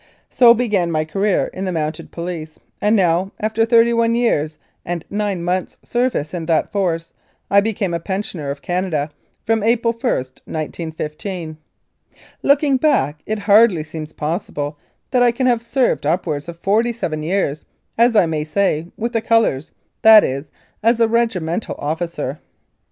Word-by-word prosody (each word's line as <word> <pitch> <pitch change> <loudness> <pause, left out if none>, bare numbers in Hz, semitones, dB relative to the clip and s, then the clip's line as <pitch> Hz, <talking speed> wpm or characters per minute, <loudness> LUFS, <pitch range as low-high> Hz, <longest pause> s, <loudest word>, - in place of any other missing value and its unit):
So 240 -2 +7
began 210 -7 0
my 155 -1 0
career 195 +5 0
in 190 - -5
the 185 - -1
Mounted 155 -2 -3
Police, 170 -2 -6 0.2
and 210 +2 +3
now, 185 0 +2
after 220 +1 +1
thirty 235 0 +5
one 230 0 +2
years 155 -11 0 0.3
and 175 -1 -4
nine 200 -4 -2
months' 180 +1 -2
service 240 - -1
in 165 -3 -4
that 160 -2 +1
Force, 170 -5 -1 0.4
I 200 0 +6
became 200 -4 -2
a 170 - -1
pensioner 185 -5 -4
of 140 0 -5
Canada 175 -5 -1 0.3
from 225 -1 +1
April 230 +1 +2
i, 250 - +2
1915. 155 +5 -5 0.9
Looking 280 -1 +3
back, 150 - +1
it 215 - -1
hardly 205 -4 +4
seems 155 0 -7
possible 150 -2 -4 0.3
that 250 -2 +3
I 245 -1 +5
can 255 +2 -2
have 240 -2 +3
served 235 - 0
upwards 160 -2 -1
of 170 - -8
forty 220 +7 +1
seven 155 -9 -3
years, 160 -3 -1 0.3
as 235 0 +3
I 205 - +6
may 155 -2 -2
say, 160 0 0
with 235 +2 -3
the 225 - +1
colours, 225 - +1 0.3
that 220 -1 +9
is, 140 +3 -3 0.3
as 230 +1 +3
a 230 - +4
regimental 225 -6 -1
officer. 155 -2 -3
185 Hz, 155 wpm, -19 LUFS, 155-225 Hz, 0.9 s, that